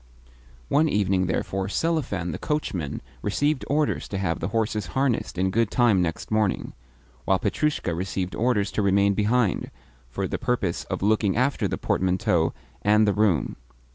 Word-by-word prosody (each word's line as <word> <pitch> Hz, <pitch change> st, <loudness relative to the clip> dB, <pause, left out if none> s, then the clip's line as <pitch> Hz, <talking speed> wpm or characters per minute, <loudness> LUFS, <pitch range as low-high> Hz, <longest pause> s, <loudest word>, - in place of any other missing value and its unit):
One 155 Hz, +2 st, +3 dB
evening, 95 Hz, -4 st, +1 dB
therefore, 95 Hz, +1 st, -1 dB
Selifan 110 Hz, -, -1 dB
the -, -, -5 dB
coachman 95 Hz, -, -3 dB, 0.2 s
received 145 Hz, -, 0 dB
orders 150 Hz, +1 st, 0 dB
to 100 Hz, -, -4 dB
have 90 Hz, -4 st, -1 dB
the 85 Hz, -, -2 dB
horses 105 Hz, -2 st, -1 dB
harnessed 130 Hz, -8 st, 0 dB
in 95 Hz, +1 st, +1 dB
good 115 Hz, +1 st, +2 dB
time 115 Hz, -7 st, +3 dB
next 80 Hz, +3 st, -3 dB
morning; 110 Hz, -2 st, 0 dB, 0.5 s
while 95 Hz, -, +3 dB
Petrushka 105 Hz, -, -1 dB
received 90 Hz, +1 st, -3 dB
orders 115 Hz, -3 st, +1 dB
to -, -, -1 dB
remain 100 Hz, 0 st, +3 dB
behind, 105 Hz, 0 st, +1 dB, 0.4 s
for -, -, -2 dB
the -, -, -3 dB
purpose 125 Hz, -8 st, -1 dB
of -, -, -4 dB
looking 105 Hz, -1 st, +2 dB
after 130 Hz, +3 st, +1 dB
the -, -, -3 dB
portmanteau 90 Hz, -3 st, +1 dB, 0.3 s
and 105 Hz, +1 st, +4 dB
the 100 Hz, -, +3 dB
room. 100 Hz, -8 st, +1 dB
100 Hz, 155 wpm, -25 LUFS, 95-120 Hz, 0.5 s, and